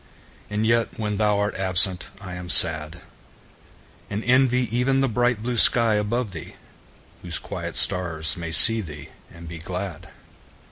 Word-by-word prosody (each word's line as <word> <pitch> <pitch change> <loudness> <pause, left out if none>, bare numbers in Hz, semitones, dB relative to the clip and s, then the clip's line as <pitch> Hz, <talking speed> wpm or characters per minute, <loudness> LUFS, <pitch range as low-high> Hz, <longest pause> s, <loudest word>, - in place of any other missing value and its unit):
And 105 +1 -3
yet 115 0 -1
when 105 -2 -5
thou 105 -1 0
art 105 0 -3
absent 95 -1 +3
I 95 -2 -11
am 90 0 -10
sad; 80 +3 +4 1.1
And 105 +2 -6
envy 125 0 +1
even 135 +2 -1
the 135 - 0
bright 120 -1 -2
blue 120 0 -4
sky 115 0 +3
above 105 +2 -3
thee, 85 -3 -11 0.7
Whose - - -6
quiet - - -8
stars 85 -3 +1
may 85 -2 -8
see 115 +6 +6
thee 75 -6 -11 0.2
and 85 0 -14
be 85 0 -10
glad. 90 -1 -8
100 Hz, 150 wpm, -21 LUFS, 85-115 Hz, 1.1 s, see